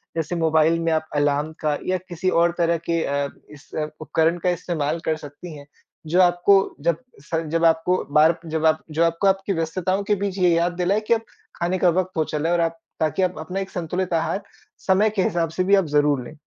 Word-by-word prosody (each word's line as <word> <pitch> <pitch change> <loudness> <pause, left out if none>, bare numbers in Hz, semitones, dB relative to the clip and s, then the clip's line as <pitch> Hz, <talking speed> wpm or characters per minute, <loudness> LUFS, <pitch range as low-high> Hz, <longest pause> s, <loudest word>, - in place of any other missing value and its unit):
जैसे 165 +1 -2
मोबाइल 160 0 +3
में 165 0 0
आप 155 0 -1
अलार्म 145 +1 +1
का 150 -1 0
या 185 0 +1
किसी 175 +2 -1
और 170 -1 +3
तरह 170 -1 +2
के 165 -1 +1
अ, 140 0 -1 0.2
इस 150 0 -15 0.3
उपकरण 160 +2 +1
का - - +4
इस्तेमाल 165 -3 -2
कर 160 - +1
सकती 145 +4 -10
हैं, 145 0 -13 0.4
जो 175 +4 +3
आपको 180 +2 +3
जब 165 +1 +1 0.3
स 165 +1 -2
जब 165 0 +2
आपको 165 +3 +2
बार 160 +2 +5
जब 160 0 -2
आप 155 0 +3
जो 160 +2 +1
आपको 165 +4 +1
आपकी 195 +1 +1
व्यस्तताओं 185 +4 -1
के 210 +1 +1
बीच 200 -1 -3
ये 180 -1 +4
याद 170 +1 +1
दिलाएँ 185 +4 0
कि - - +4
अब 225 - 0 0.3
खाने 175 +2 -1
का 180 -1 +3
वक़्त 185 +2 0
हो 160 - +3
चला 155 +1 -2
है - - +2
और 170 - +1
आप 165 0 -1 0.2
ताकि 155 +4 0
आप 185 0 0
अपना 180 +5 -4
एक 195 0 -4
संतुलित 180 +1 -3
आहार 165 +4 0 0.4
समय 195 +3 +3
के 190 - +2
हिसाब 170 -2 0
से 185 +3 -1
भी 195 +2 +4
आप 195 -2 +2
ज़रूर 145 -2 +2
लें। 150 - -11
170 Hz, 220 wpm, -22 LUFS, 160-185 Hz, 0.4 s, बार